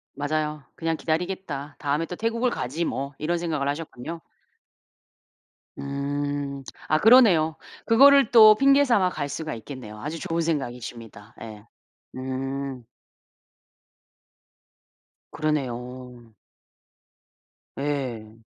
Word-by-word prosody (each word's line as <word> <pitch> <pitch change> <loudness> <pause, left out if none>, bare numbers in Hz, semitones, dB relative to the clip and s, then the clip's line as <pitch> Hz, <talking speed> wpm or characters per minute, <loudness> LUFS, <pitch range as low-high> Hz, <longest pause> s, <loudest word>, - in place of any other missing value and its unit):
맞아요. 150 0 -2
'그냥 165 -1 -2
기다리겠다. 160 -4 -3
다음에 145 +3 -1
또 180 - -7
태국을 230 +4 0
가지, 155 - -3
뭐' 140 -1 -4
이런 170 +3 -1
생각을 155 -5 -2
하셨군요. 160 +1 -6 1.6
음. 140 0 -3 0.2
아 155 - +2
그러네요. 195 -9 +6 0.3
그거를 275 +4 +6
또 215 -3 +9
핑계 275 +4 +5
삼아 210 -9 +3
갈 145 -4 -4
수가 155 0 -4
있겠네요. 115 -3 -9
아주 155 +3 -5
좋은 165 +1 -2
생각이십니다. 120 -8 -5
예. 110 -1 -10 0.5
음. 130 0 -4 2.5
그러네요. 125 -5 -4 1.4
예. 125 -6 -4
145 Hz, 215 characters per minute, -25 LUFS, 130-170 Hz, 2.5 s, 또